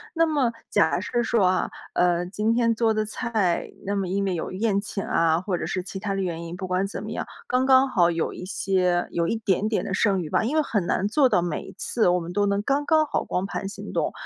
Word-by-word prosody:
那 330 - +4
么 285 -7 +1 0.2
假 - - +3
设 240 -1 -1
说 225 -4 +2
啊， 185 0 +1 0.2
呃， 175 0 +2
今 210 +5 -1
天 230 -1 +3
做 225 -1 +1
的 215 0 0
菜， 215 -5 -1 0.2
那 200 +1 -1
么 195 -2 -1
因 195 +2 -1
为 190 - 0
有 170 - -4
宴 200 +1 0
请 200 -1 -5
啊， 165 0 +2
或 185 -1 -2
者 - - -3
是 185 -1 -2
其 195 0 -7
它 200 -1 -2
的 195 - -1
原 170 -2 -3
因。 170 +1 -6
不 185 0 -5
管 185 +2 0
怎 205 - -6
么 215 - -6
样， - - -4 0.2
刚 255 +1 +1
刚 265 0 +6
好 175 -7 +3
有 165 -1 -1
一 - - -8
些 180 -2 0
有 170 0 0
一 - - 0
点 210 -1 0
点 220 - -1
的 185 - -3
剩 195 -3 +2
余 155 - -8
吧。 - - +2
因 270 +8 -1
为 310 - +3
很 205 -10 -1
难 195 - +1
做 265 +4 +3
到 175 - +2
每 170 -3 -2
一 - - -11
次 230 - 0
我 180 0 +3
们 175 +1 -6
都 205 0 +2
能 200 0 0
刚 280 +5 0
刚 315 -1 +4
好 - - -1
光 185 +2 -2
盘 195 0 -4
行 200 - -8
动， - - 0
200 Hz, 280 characters per minute, -25 LUFS, 180-230 Hz, 0.2 s, 刚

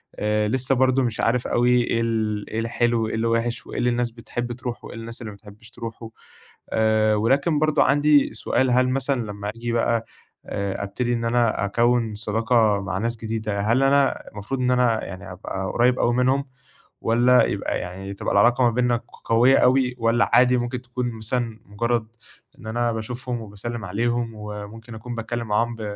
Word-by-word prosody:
آآ، 105 0 0
لسه 130 +4 +1
برضه 130 +1 +3
مش 115 -2 -2
عارف 120 +1 +1
أوي 120 +1 +2
إيه 115 -1 0
ال 110 -2 -1
إيه 110 - -3
الحلو، 115 0 0
إيه - - -3
اللي 110 +1 0
وِحش 115 +1 -1
وإيه - - -7
اللي 125 - +2
الناس 120 0 0
بتحب 120 +1 -5
ترُوحه 120 -1 -6
وإيه - - -9
الناس 115 +2 -7
اللي 110 -3 -6
ما - - -11
بتحبّش 105 +2 -15
ترُوحه، 115 -1 -8 0.6
آآ 110 -1 +2
ولكن 140 +8 +2
برضه 155 0 +3
عندي 145 -1 +3
سؤال، 125 +3 0
هل 125 +1 +3
مثلًا 135 0 0
لمّا 105 0 -5
ييجي 120 +1 -4
بقى 115 -1 +1 0.4
آآ 100 0 -3
أبتدي 120 +5 -2
إن 115 -1 -2
أنا 115 -3 +1
أكوّن 115 +1 +1
صداقة 110 0 +2
مع 95 -1 -3
ناس 115 +3 -2
جديدة، 110 -2 -3
هل 115 +6 +2
أنا 140 0 +2
المفروض 105 +6 -5
إن 125 0 +2
أنا 125 -3 +2
يعني 95 0 -8
أبقى 95 +1 -5
قريّب 125 +1 +3
أوي 120 - +2
منهم 130 +3 +2 0.6
والّا 120 +2 +4
يبقى - - -2
يعني 95 +2 -6
تبقى 100 - -3
العلاقة 120 +5 +4
ما 120 - +5
بيننا 120 +1 +1
ق 120 - -16
قوية 120 +4 +5
أوي 125 -1 +3
والّا 115 +1 +2
عادي 125 0 +5
ممكن 120 +1 -3
تكون 125 0 -3
مثلًا 115 0 -3
مُجرّد 115 +2 -1 0.5
إن 110 - -11
أنا 120 +1 0
باشوفهم 120 +2 -4
وباسلّم 110 +2 -6
عليهم 120 +4 -1
وممكن 105 +2 -8
أكون 120 +2 -7
باتكلّم 115 +1 -4
معاهم 115 +3 0
ب 115 - -10
115 Hz, 185 wpm, -23 LUFS, 110-125 Hz, 0.6 s, ما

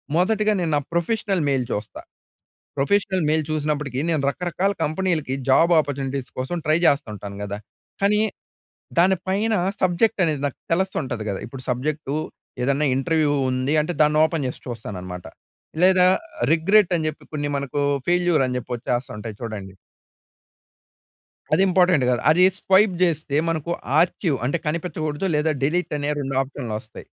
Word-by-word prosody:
మొదటిగా 210 +4 +2
నేను 165 -2 0
నా - - +3
ప్రొఫెషనల్ 195 +1 0
మెయిల్ 135 -3 +1
చూస్తా. 105 +1 -4 0.8
ప్రొఫెషనల్ 190 +4 +1
మెయిల్ 155 0 +2
చూసినప్పటికీ 150 -4 -1
నేను 160 -3 +1
రకరకాల 180 +5 -1
కంపెనీలకి 160 -3 -1 0.2
జాబ్ 165 +6 +5
అపార్చునిటీస్ 135 -2 -4
కోసం 135 +7 -2
ట్రై 155 +1 +3
చేస్తుంటాను 105 -8 -1
కదా! 100 0 -4 0.5
కానీ, 210 +1 +4 0.8
దాని 190 +2 +4
పైన 210 +4 +1 0.3
సబ్జెక్ట్ 185 +3 +2
అనేది 150 -4 -1
నాకు 140 - -8 0.2
తెలుస్తుంటది 135 - -2
కదా. 100 - -3
ఇప్పుడు 130 +2 -9
సబ్జెక్టూ 140 +3 -2 0.5
ఏదన్నా 140 +3 +2
ఇంటర్వ్యూ 150 +2 +1 0.2
ఉంది 130 +3 0
అంటే 155 +4 -3
దాన్ని 150 0 +3
ఓపెన్ 160 -3 -2
చేసి 125 - -7
చూస్తాననమాట. 90 -6 -7 0.6
లేదా 185 -1 +6 0.5
రిగ్రెట్ 190 +4 +4
అని 155 -1 -1
చెప్పి 155 - -10
కొన్ని 145 -1 -2
మనకు 140 0 -3 0.3
ఫెయిల్యూర్ 175 -4 +3
అని 125 - -3
చెప్పి 120 - -12
వచ్చేస్తా 120 +1 -2
ఉంటాయి 105 0 -7
చూడండి. 105 -5 -6 1.8
అది - - +4
ఇంపార్టెంట్ 180 -6 +4
కాదు. 125 - +1
అది 175 +4 +5
స్వైప్ 190 0 +4
చేస్తే 155 -4 -1
మనకు 165 0 -1 0.3
ఆర్చీవ్ 170 -2 +2
అంటే 145 +6 0
కనిపించకూడదు. 155 0 -2
లేదా 155 +1 +1
డిలీట్ 175 +3 0
అనే 145 0 -1
2 135 -1 -3
ఆప్షన్‌లు 130 -4 -6
వస్తాయి. 110 - -13
155 Hz, 140 wpm, -23 LUFS, 130-180 Hz, 1.8 s, లేదా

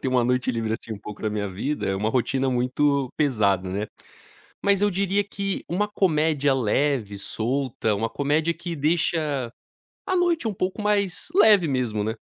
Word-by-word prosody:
ter - - -1
uma 125 -2 +2
noite 125 +1 +1
livre 115 -1 -2
assim 115 0 -5
um 105 - -6
pouco 105 -1 -9
na 110 - 0
minha 105 -1 -2
vida 110 +10 -3
é 95 - 0
uma 105 +3 0
rotina 130 +2 0
muito 130 +2 +1
pesada, 100 - +1
né. 100 +3 -2 0.8
Mas 200 0 +3
eu 205 - +3
diria 195 +1 +1
que 195 -1 -4
uma 205 +4 0
comédia 155 -8 +2
leve, 125 -3 0
solta, 115 +1 -1
uma 115 +3 -1
comédia 150 +5 0
que 170 0 -6
deixa 150 -4 0 0.5
a 375 - 0
noite 345 -8 +1
um 210 - -2
pouco 185 +3 -3
mais 200 -3 0
leve 205 - +6
mesmo, 120 -6 -1
né. 110 +2 -2
140 Hz, 175 wpm, -24 LUFS, 115-180 Hz, 0.8 s, leve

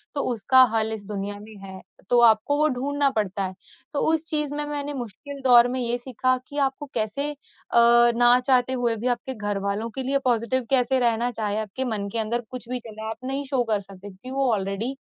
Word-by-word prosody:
तो 280 - 0
उसका 260 +4 +4
हल 220 0 +1
इस 210 -2 -7
दुनिया 205 0 -4
में 215 +1 -12
है। 190 -1 -9 0.3
तो 245 - +4
आपको 230 +5 +4
वो 305 +1 +3
ढूँढना 280 +2 0
पड़ता 205 -5 -2
है, 190 0 -4 0.4
तो 285 - -1
उस 320 0 -1
चीज़ 300 -3 0
में 295 - -2
मैंने 290 0 -4
मुश्किल 270 +3 -8
दौर 245 -1 +7
में 255 +1 -3
ये 240 -1 0
सीखा 255 +1 0
कि 290 - -9
आपको 270 +2 -8
कैसे 230 +6 -2
अ, - - -9 0.8
ना 245 +1 +5
चाहते 255 -1 +3
हुए 240 -2 0
भी 235 +4 -3
आपके 245 +1 -1
घरवालों 205 0 -3
के 265 - -3
लिए 275 +2 +1
पॉज़िटिव 240 +1 +1
कैसे 260 0 +3
रहना, 240 0 +1
चाहे 210 -3 -2
आपके 220 +5 -4
मन 215 -4 -3
के 230 - -2
अंदर 230 +2 -1
कुछ 245 -2 -8
भी 250 0 -2
चल 225 -3 -12
रहा 220 - -7
है, 220 - -3
आप 225 +3 -9
नहीं 275 +1 -3
शो 265 -2 0
कर 210 - +2
सकते 195 0 -13
क्योंकि 200 +7 -11
वो 270 -2 +1
ऑलरेडी 205 +6 -2
240 Hz, 225 wpm, -24 LUFS, 215-265 Hz, 0.8 s, दौर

